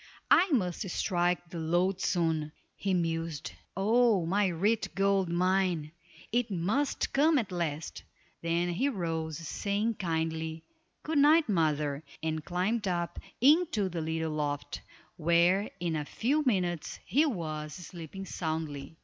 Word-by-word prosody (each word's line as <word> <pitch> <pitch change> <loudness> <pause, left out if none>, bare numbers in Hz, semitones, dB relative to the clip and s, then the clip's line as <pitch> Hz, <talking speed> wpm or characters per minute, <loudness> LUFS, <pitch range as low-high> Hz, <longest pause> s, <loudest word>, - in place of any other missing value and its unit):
"I 370 - +6
must 185 - 0
strike 175 -1 0
the 170 - -5
lode 175 +4 +1
soon," 160 -4 0 0.2
he 195 - -2
mused. 165 - -1 0.3
"Oh, 215 -2 +3
my 200 +4 +2
rich 200 +6 0
gold 195 -2 +2
mine; 180 -3 +1 0.4
it 240 0 +1
must 205 +10 0
come 300 +3 +4
at 215 -7 -1
last." 160 -3 -3 0.4
Then 170 +1 0
he 220 +12 +1
rose, 165 - -3
saying, 205 +6 -2
kindly, 160 -2 -2 0.4
"Good 310 -1 +1
night, 305 +3 +6
mother," 150 -6 +1 0.2
and 160 -1 -2
climbed 195 +5 -1
up 175 -2 -2 0.2
into 280 - +4
the 170 -2 -3
little 160 0 -2
loft, 145 -1 -3 0.4
where 170 +4 +3
in 170 -2 -1
a 150 - -1
few 275 - 0
minutes 180 -7 0
he 300 +5 +3
was 155 - -3
sleeping 175 +1 -8
soundly. 160 -4 -4
175 Hz, 130 wpm, -30 LUFS, 160-205 Hz, 0.4 s, I